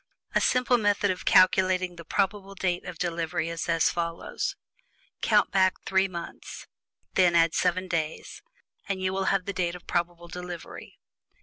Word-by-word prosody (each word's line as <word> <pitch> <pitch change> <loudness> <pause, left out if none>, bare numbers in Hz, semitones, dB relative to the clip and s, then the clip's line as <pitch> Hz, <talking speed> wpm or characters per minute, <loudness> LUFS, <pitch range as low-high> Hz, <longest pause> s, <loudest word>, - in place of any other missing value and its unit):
A - - +3
simple 250 -1 +3
method 205 -2 +2
of 185 - -6
calculating 185 -1 +4
the 170 - -10
probable 195 +1 -1
date 180 -2 -1
of 180 -2 -7
delivery 165 -1 -2
is 165 0 -4
as 165 -1 +3
follows: 170 -1 -3 0.7
COUNT - - +3
BACK 190 -1 +3
THREE 190 0 +2
MONTHS, 170 -2 -8 0.4
AND - - -42
THEN 180 -2 +4
ADD 165 -1 +4
SEVEN 185 +1 +1
DAYS, 160 -3 -3 0.5
AND 195 -1 -1
YOU 185 0 0
WILL 190 0 -1
HAVE 195 -2 +1
THE 200 - -3
DATE 175 -2 -1
OF 180 - -12
PROBABLE 175 0 -2
DELIVERY. 180 -1 -8
180 Hz, 165 wpm, -27 LUFS, 170-190 Hz, 0.7 s, calculating